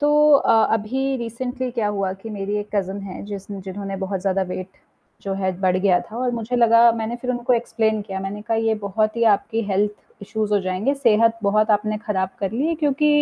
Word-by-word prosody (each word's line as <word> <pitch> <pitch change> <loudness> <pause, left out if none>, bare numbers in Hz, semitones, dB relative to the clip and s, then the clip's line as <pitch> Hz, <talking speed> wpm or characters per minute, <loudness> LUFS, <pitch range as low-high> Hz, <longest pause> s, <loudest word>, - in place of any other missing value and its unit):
तो 290 - +3 0.3
अ, 275 - +4 0.2
अभी 265 +5 -1
रिसेंटली 250 +2 -4
क्या 230 -4 -1
हुआ 195 -2 -1
कि 195 +4 -9
मेरी 205 0 -3
एक 205 0 -5
कज़िन 195 0 -1
है 190 -2 -7
जिसन 200 -1 -7
जिन्होंने 195 +1 -5
बहुत 190 0 -3
ज़्यादा 195 0 0
वेट 185 0 -5 0.5
जो 195 - -3
है 190 -1 0
बढ़ 185 -1 +2
गया 185 -1 +3
था 220 - -8
और 250 0 0
मुझे 235 +2 -2
लगा 235 0 +6
मैंने 225 +1 -3
फिर 250 +1 -4
उनको 245 0 0
एक्सप्लेन 220 -2 +1
किया 195 -2 -5
मैंने 195 +2 -5
कहा 225 +1 -1
ये 225 0 +1
बहुत 215 +2 0
ही 235 - 0
आपकी 225 +3 -3
हेल्थ 205 +2 +2 0.3
इश्यूज़ 215 +1 -2
हो 205 - +4
जाएँगे 190 +8 -1
सेहत 230 -4 +3
बहुत 215 +2 +2
आपने 215 0 +1
ख़राब 190 -3 0
कर 195 - -1
ली 295 +8 0
क्योंकि 295 0 +2
215 Hz, 210 wpm, -22 LUFS, 195-235 Hz, 0.5 s, लगा